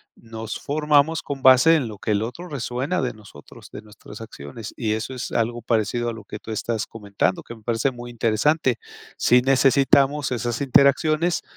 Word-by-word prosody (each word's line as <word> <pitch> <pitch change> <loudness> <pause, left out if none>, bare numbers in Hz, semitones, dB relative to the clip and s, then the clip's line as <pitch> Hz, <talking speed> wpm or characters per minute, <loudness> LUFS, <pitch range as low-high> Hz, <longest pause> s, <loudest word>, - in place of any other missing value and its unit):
nos 115 -1 -7
formamos 150 +2 +1
con 140 -2 -6
base 130 +5 +6
en 130 -6 -2
lo 105 -2 -8
que 110 - -2
el 100 0 +1
otro 170 +11 -6
resuena 135 +5 -2
de 125 -2 -2
nosotros, 105 -9 -15
de - - -8
nuestras 105 0 -13
acciones. 105 0 -9
y 110 -3 -1
eso 110 +4 -4
es 125 -2 -6
algo 120 +1 -1
parecido 115 +1 0
a - - -4
lo 110 -2 -11
que 105 - -7
tú 110 - -9
estás 110 0 -2
comentando 100 -3 -2
que 120 - -10
me 110 - -19
parece 120 +4 0
muy 120 0 -9
interesante. 120 +4 +1 0.4
Si 125 0 +4
necesitamos 135 +1 +3
esas 120 0 -2
interacciones 155 +5 +3
120 Hz, 180 wpm, -23 LUFS, 110-140 Hz, 0.4 s, base